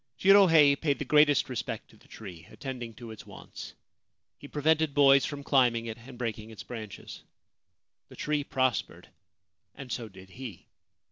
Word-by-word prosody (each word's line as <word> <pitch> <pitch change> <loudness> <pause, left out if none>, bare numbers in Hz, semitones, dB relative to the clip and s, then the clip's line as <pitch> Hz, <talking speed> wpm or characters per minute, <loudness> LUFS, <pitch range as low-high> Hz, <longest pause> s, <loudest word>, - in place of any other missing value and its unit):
Jirohei 175 -7 +6
paid 140 0 -1
the - - -5
greatest 150 -2 +4
respect 125 -7 -5
to - - -20
the - - -23
tree, 90 -6 -11
attending 125 -5 -7
to 115 0 -10
its 110 - -12
wants. - - -11 0.6
He - - -11
prevented 155 0 +1
boys 140 -1 +6
from 145 -2 -6
climbing 120 -5 +2
it 115 0 -7
and 125 +2 -13
breaking 115 -2 -4
its 110 - -10
branches. 110 -4 -9 0.9
The - - -13
tree 150 -1 -1
prospered, 130 -5 -2 0.7
and 135 -3 -9
so 115 -2 -4
did 95 -1 -15
he. 120 -4 -9
130 Hz, 155 wpm, -28 LUFS, 115-145 Hz, 0.9 s, Jirohei